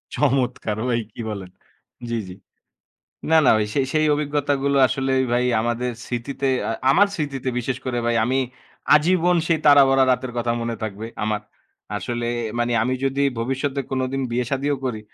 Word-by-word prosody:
চমৎকার! 125 Hz, -6 st, 0 dB
ওই 120 Hz, -, +1 dB
কি 115 Hz, -, -8 dB
বলেন? 100 Hz, -4 st, -6 dB, 0.6 s
জ্বি, 115 Hz, -, -1 dB
জ্বি। 90 Hz, -, -9 dB, 1.0 s
না, -, -, +6 dB
না, -, -, +6 dB
ওই 105 Hz, -, +1 dB
সেই 135 Hz, -2 st, +1 dB
সেই 155 Hz, 0 st, +3 dB
অভিজ্ঞতাগুলো 145 Hz, -1 st, 0 dB
আসলে 135 Hz, +1 st, -1 dB, 0.2 s
ভাই 125 Hz, +1 st, +2 dB, 0.2 s
আমাদের 120 Hz, +2 st, -1 dB
স্মৃতিতে 130 Hz, +3 st, -3 dB, 0.2 s
আ -, -, 0 dB, 0.2 s
আমার 200 Hz, +6 st, +5 dB
স্মৃতিতে 140 Hz, -4 st, -3 dB
বিশেষ 125 Hz, +1 st, -2 dB
করে 120 Hz, -1 st, -1 dB
ভাই 120 Hz, -, +1 dB
আমি 130 Hz, +2 st, +1 dB, 0.6 s
আজীবন 175 Hz, +3 st, +3 dB
সেই 160 Hz, -2 st, +2 dB
তারাভরা 135 Hz, -2 st, +6 dB
রাতের 125 Hz, 0 st, -1 dB
কথা 120 Hz, 0 st, 0 dB
মনে 115 Hz, 0 st, -2 dB
থাকবে 110 Hz, +1 st, -5 dB, 0.2 s
আমার। 105 Hz, -1 st, -1 dB, 0.6 s
আসলে 120 Hz, +2 st, -3 dB, 0.3 s
মানি 120 Hz, 0 st, 0 dB
আমি 130 Hz, +2 st, 0 dB
যদি 135 Hz, +1 st, 0 dB, 0.2 s
ভবিষ্যতে 135 Hz, +3 st, -2 dB
কোনোদিন 130 Hz, +1 st, -1 dB
বিয়ে-শাদীও 135 Hz, +4 st, 0 dB
করি, 110 Hz, -4 st, -2 dB
130 Hz, 155 wpm, -22 LUFS, 120-140 Hz, 1.0 s, না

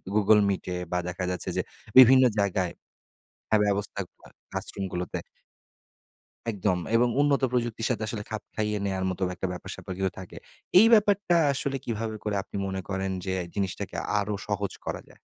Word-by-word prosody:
google 105 Hz, 0 st, +5 dB
Meet 100 Hz, -2 st, -1 dB
এ -, -, -2 dB, 0.2 s
বা 90 Hz, -, +1 dB
দেখা 90 Hz, +1 st, -4 dB
যাচ্ছে 90 Hz, -, -3 dB
যে -, -, +3 dB, 0.4 s
বিভিন্ন 130 Hz, +1 st, +9 dB, 0.2 s
জায়গায় 95 Hz, -3 st, +1 dB, 0.8 s
হ্যাঁ, 110 Hz, -1 st, +4 dB
ব্যবস্থা 100 Hz, 0 st, 0 dB
ক -, -, -43 dB, 0.4 s
ক্লাসরুম 100 Hz, -, -4 dB
গুলোতে 90 Hz, -1 st, -3 dB, 1.3 s
একদম 100 Hz, -3 st, 0 dB, 0.2 s
এবং 120 Hz, +1 st, +5 dB
উন্নত 145 Hz, -1 st, +3 dB
প্রযুক্তির 120 Hz, -2 st, -1 dB
সাথে 115 Hz, -3 st, -1 dB
আসলে 105 Hz, -1 st, -4 dB
খাপ 110 Hz, -1 st, -4 dB
খাইয়ে 105 Hz, -1 st, 0 dB
নেয়ার 95 Hz, -1 st, -1 dB
মতো 95 Hz, +1 st, -5 dB
একটা 95 Hz, -, -3 dB
ব্যাপার-স্যাপার 95 Hz, +1 st, -7 dB
কিন্তু 95 Hz, -1 st, 0 dB
থাকে। 95 Hz, -, -10 dB, 0.4 s
এই 220 Hz, -, +8 dB
ব্যাপারটা 205 Hz, -4 st, +4 dB, 0.2 s
আসলে 135 Hz, 0 st, -2 dB
কিভাবে 110 Hz, -1 st, -3 dB
করে 105 Hz, -1 st, -1 dB
আপনি -, -, -7 dB
মনে 95 Hz, 0 st, -3 dB
করেন 95 Hz, 0 st, -1 dB
যে 95 Hz, -, -1 dB, 0.2 s
জিনিসটাকে 95 Hz, -3 st, -3 dB, 0.2 s
আরো 105 Hz, +1 st, -2 dB
সহজ 100 Hz, -1 st, -1 dB
করা -, -, -3 dB
যায়? -, -, -19 dB
105 Hz, 165 wpm, -27 LUFS, 95-115 Hz, 1.3 s, বিভিন্ন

